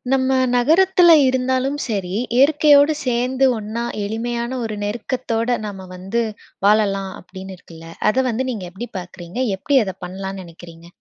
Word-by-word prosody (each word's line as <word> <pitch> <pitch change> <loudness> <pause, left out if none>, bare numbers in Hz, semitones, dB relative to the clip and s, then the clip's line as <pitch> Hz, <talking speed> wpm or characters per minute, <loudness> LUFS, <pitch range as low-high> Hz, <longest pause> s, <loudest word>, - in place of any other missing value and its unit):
நம்ம 265 0 +2 0.2
நகரத்தில 345 +6 +5
இருந்தாலும் 260 +2 0
சரி. 195 -6 -3 0.2
இயற்கையோடு 290 +2 +5
சேர்ந்து 255 +2 +1
ஒண்ணா 220 +2 -4 0.2
எளிமையான 235 +4 -3
ஒரு 215 -1 -5
நெருக்கத்தோட, 235 +2 -2
நம்ம 190 -2 -8
வந்து 195 +6 -2 0.4
வாழலா 205 -2 +3 0.2
அப்படின்னு 190 +1 -10
இருக்குல்ல, 165 -2 -13 0.2
அதை 260 +4 +1
வந்து 240 +3 -2
நீங்க 210 -7 -5
எப்படி 235 +7 -7
பார்க்குறிங்க? 175 +4 -8 0.2
எப்படி 280 +8 +1
அதை 190 -2 -5
பண்ணலான்னு 190 +1 -6
நினைக்கிறீங்க. 170 0 -13
230 Hz, 130 wpm, -20 LUFS, 190-260 Hz, 0.4 s, நகரத்தில